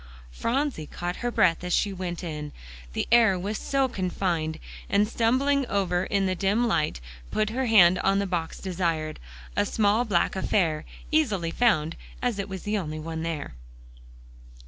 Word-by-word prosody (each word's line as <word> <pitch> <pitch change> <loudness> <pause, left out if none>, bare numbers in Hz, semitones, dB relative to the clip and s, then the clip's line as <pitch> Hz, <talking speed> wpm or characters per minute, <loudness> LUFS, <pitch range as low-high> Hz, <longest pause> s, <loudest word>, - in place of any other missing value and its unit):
Phronsie 245 - -1
caught 175 +3 -4
her 245 - -2
breath 180 -7 +2
as 180 -1 -2
she 200 - +2
went 180 -1 -5
in, 150 -3 -5 0.4
the - - -2
air 225 -5 +6
was 205 +4 -3
so 275 -1 +1
confined; 180 -7 -2 0.3
and 205 +1 +3
stumbling 260 +5 +2
over 185 -2 0
in 200 -1 +1
the 185 - +1
dim 200 +6 +1
light, 155 - 0 0.3
put 215 0 0
her 260 +2 -1
hand 185 -5 +6
on 195 0 +2
the 200 - +1
box 175 -4 -3
desired, 170 -4 -2 0.4
a - - +3
small 210 - +2
black 215 -4 +1
affair, 165 -5 +1 0.3
easily 210 - +1
found, 170 -8 +2 0.2
as 245 -5 -1
it 200 0 -3
was 190 -2 -6
the 210 0 0
only 155 -4 -5
one 160 +1 -5
there. 160 - -4
190 Hz, 165 wpm, -26 LUFS, 165-220 Hz, 0.4 s, air